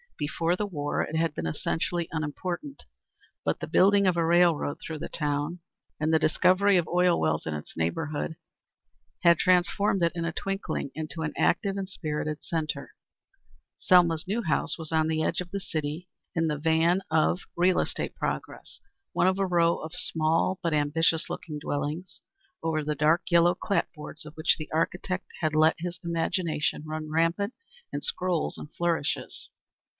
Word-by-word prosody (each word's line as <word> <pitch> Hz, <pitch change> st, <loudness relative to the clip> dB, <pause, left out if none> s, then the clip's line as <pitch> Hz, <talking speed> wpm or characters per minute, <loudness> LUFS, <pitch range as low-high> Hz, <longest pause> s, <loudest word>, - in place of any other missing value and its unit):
Before 165 Hz, +4 st, 0 dB
the 210 Hz, -, -1 dB
war 145 Hz, -6 st, -2 dB
it 160 Hz, -, -5 dB
had 165 Hz, -1 st, +1 dB
been -, -, -3 dB
essentially 165 Hz, -, -1 dB
unimportant. 175 Hz, -, -4 dB, 0.6 s
But -, -, 0 dB
the -, -, -4 dB
building 200 Hz, +1 st, +5 dB
of 180 Hz, -2 st, +3 dB
a 165 Hz, -, +2 dB
railroad 170 Hz, -3 st, +3 dB
through 160 Hz, -, -6 dB
the -, -, -5 dB
town 150 Hz, +3 st, -1 dB, 0.4 s
and 155 Hz, +1 st, +1 dB
the 160 Hz, -, +5 dB
discovery 185 Hz, +5 st, +4 dB
of 170 Hz, -3 st, +1 dB
oil 180 Hz, 0 st, +3 dB
wells 80 Hz, -1 st, 0 dB
in 80 Hz, -, -2 dB
its 75 Hz, 0 st, -7 dB
neighborhood 145 Hz, -, -2 dB, 0.9 s
had 170 Hz, -1 st, +6 dB
transformed 185 Hz, +2 st, +3 dB
it 170 Hz, -, +3 dB
in 170 Hz, -1 st, -2 dB
a 170 Hz, -, -1 dB
twinkling 195 Hz, -6 st, -3 dB
into 160 Hz, +1 st, -5 dB
an 155 Hz, -1 st, -2 dB
active 195 Hz, -1 st, +2 dB
and 195 Hz, -1 st, -3 dB
spirited 155 Hz, -4 st, -3 dB
centre. 160 Hz, -2 st, -3 dB, 0.8 s
Selma's 175 Hz, -2 st, +4 dB
new 225 Hz, +5 st, -1 dB
house 160 Hz, -6 st, +1 dB
was 160 Hz, -2 st, -5 dB
on 160 Hz, -1 st, +2 dB
the 160 Hz, 0 st, 0 dB
edge 165 Hz, -, 0 dB
of 180 Hz, -1 st, -4 dB
the 200 Hz, -, -2 dB
city, 155 Hz, 0 st, -4 dB, 0.3 s
in 165 Hz, -1 st, +2 dB
the 150 Hz, -1 st, -1 dB
van 165 Hz, +4 st, +3 dB
of 160 Hz, +3 st, +2 dB
real 180 Hz, +1 st, +3 dB
estate -, -, -2 dB
progress, -, -, -4 dB, 0.3 s
one -, -, +3 dB
of 190 Hz, +1 st, +2 dB
a 195 Hz, -, +2 dB
row 170 Hz, -2 st, +3 dB
of 160 Hz, 0 st, -7 dB
small 165 Hz, +4 st, +1 dB
but 170 Hz, -3 st, 0 dB
ambitious 160 Hz, +2 st, +2 dB
looking 150 Hz, -3 st, -5 dB
dwellings, 150 Hz, +5 st, -4 dB, 0.4 s
over 160 Hz, -2 st, 0 dB
the 150 Hz, 0 st, -1 dB
dark 155 Hz, +4 st, +3 dB
yellow 170 Hz, 0 st, +5 dB
clapboards 155 Hz, -5 st, -3 dB
of 150 Hz, -, -10 dB
which 155 Hz, -, +2 dB
the 155 Hz, -, -7 dB
architect 180 Hz, +3 st, -1 dB
had 155 Hz, -2 st, 0 dB
let 155 Hz, +1 st, +5 dB
his 175 Hz, 0 st, -5 dB
imagination 165 Hz, -3 st, -1 dB
run 155 Hz, 0 st, -5 dB
rampant 165 Hz, +7 st, +1 dB, 0.4 s
in -, -, -3 dB
scrolls 185 Hz, -, -1 dB
and 150 Hz, -, -10 dB
flourishes. 170 Hz, -4 st, -2 dB
165 Hz, 170 wpm, -27 LUFS, 155-180 Hz, 0.9 s, had